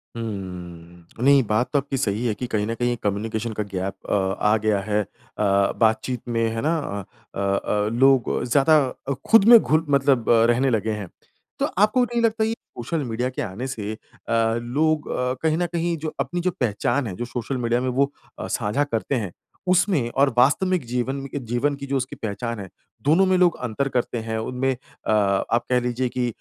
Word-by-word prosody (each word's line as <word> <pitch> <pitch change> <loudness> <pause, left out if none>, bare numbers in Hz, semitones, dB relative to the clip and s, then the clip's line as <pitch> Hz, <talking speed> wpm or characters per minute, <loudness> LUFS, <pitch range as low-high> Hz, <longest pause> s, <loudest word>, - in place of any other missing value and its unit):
हुँ। 90 -6 -7
अ, - - -5
नहीं, 140 0 +6
बात 110 +4 +1
तो 145 - +4
आपकी 140 0 -4
सही 115 -2 -1
है 115 - +1
कि 125 - -4
कहीं 105 -3 -1
न 115 - -1
कहीं 120 +1 0
एक 115 - -8
कम्युनिकेशन 110 +2 -2
का 105 - -2
गैप 95 +1 -2 0.2
अ, - - +1 0.3
आ 105 - +5
गया 105 -1 +1
है 105 +1 0
अ, - - -18 0.7
बातचीत 110 +2 +1
में। 115 -1 0
है 115 - -2
ना? 160 +4 +1
अ 100 -6 -7
अ, 100 +1 0
लोग 130 -1 +3
ज़्यादा 145 +5 +4 0.3
अ, 140 - +1 0.2
खुद 225 -3 +7
में 235 -1 +10
घुल 160 -2 +1
मतलब 135 -4 +3 0.2
रहने 130 +3 +3
लगे 110 -2 0
हैं। 90 - -8 0.5
तो - - +2
आपको 215 +5 +4
नहीं 240 -1 -1
लगता, 225 -1 +2
ये 225 - 0
सोशल 150 - -5
मीडिया 120 +3 -1
के 130 - -5
आने 115 +4 -4
से 110 -4 -4
अ, - - -9 0.6
लोग 150 +6 0
अ, 125 0 -1
कहीं 160 0 +2
न 175 - +1
कहीं 170 0 0
जो 155 - -3
अपनी 175 0 -2
जो 185 +1 +1
पहचान 125 +3 0
है, 90 - -5
जो 120 - -4
सोशल 120 +2 -4
मीडिया 120 +1 +1
में 130 - -1
वो 140 +3 +1 0.3
अ, - - -4
साझा 110 +4 0
करते 135 0 -2
हैं, 100 -7 -2 0.4
उसमें 180 - +2
और 140 -3 +4
वास्तविक 165 +5 +3
जीवन 125 +3 -2
म 135 - -6
इ - - -1
जीवन 140 +4 +1
की 140 0 -7
जो 140 - 0
उसकी 130 0 -4
पहचान 115 +1 -4
है, 95 - -7 0.3
दोनों 160 +7 +4
में 185 0 +3
लोग 180 -1 +4
अंतर 135 +5 -1
करते 125 -1 -1
हैं, 110 0 -2
उनमें 125 +4 -1
अ, 125 - -7
आप 105 +2 +1
कह 125 -1 +3
लीजिए 125 +1 -1
कि 125 0 -1
125 Hz, 205 wpm, -23 LUFS, 110-145 Hz, 0.7 s, में